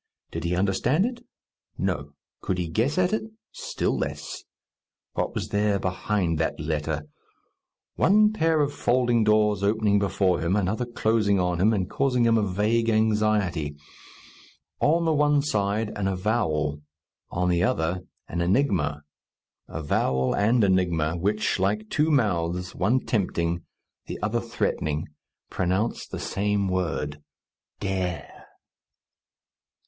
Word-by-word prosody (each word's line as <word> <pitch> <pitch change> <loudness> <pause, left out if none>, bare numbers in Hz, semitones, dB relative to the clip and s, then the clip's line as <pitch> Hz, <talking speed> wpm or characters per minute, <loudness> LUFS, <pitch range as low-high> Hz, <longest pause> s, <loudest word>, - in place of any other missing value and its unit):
Did - - -4
he 85 +1 0
understand 100 - +2
it? 240 -1 -5 0.5
No. 70 0 -2 0.3
Could 95 - -1
he 90 -2 -2
guess 115 - 0
at 185 +2 +2
it? 220 - +1 0.3
Still - - -2
less. - - -4 0.7
What - - -2
was - - -3
there 105 0 +1
behind 95 -3 -1
that 80 - -1
letter? 75 0 -2 0.9
One 210 +3 +5
pair 160 -5 +2
of 145 0 0
folding 120 -2 +2
doors 105 -2 +3
opening 105 0 +2
before 95 -3 +1
him, 85 +3 0
another 105 +5 0
closing 110 -4 +1
on 90 -1 0
him, 105 +4 +5
and 95 -5 0
causing 125 +1 +1
him 115 -1 +4
a 110 - +3
vague 105 +4 +1
anxiety. 105 -8 +1 1.0
On 165 +3 +3
the 160 - +3
one 145 -1 +3
side 105 -4 0
an 100 -2 -1
avowal; 80 -7 0 0.5
on 90 +1 -1
the 85 -1 +2
other 85 +1 0 0.3
an 85 - -3
enigma 85 - +1 0.6
avowal 65 -4 0
and 110 +3 +3
enigma, 85 -5 +2
which, 100 +4 0
like 105 +3 0
two 150 +2 +2
mouths, 90 - 0
one 115 +8 +1
tempting, 85 -5 0 0.5
the - - -5
other 115 +3 0
threatening, 80 -10 -2 0.4
pronounce 95 +5 -1
the - - -6
same 100 0 -1
word, 85 -5 -2 0.6
Dare! 90 -5 -4
100 Hz, 130 wpm, -25 LUFS, 85-115 Hz, 1.0 s, One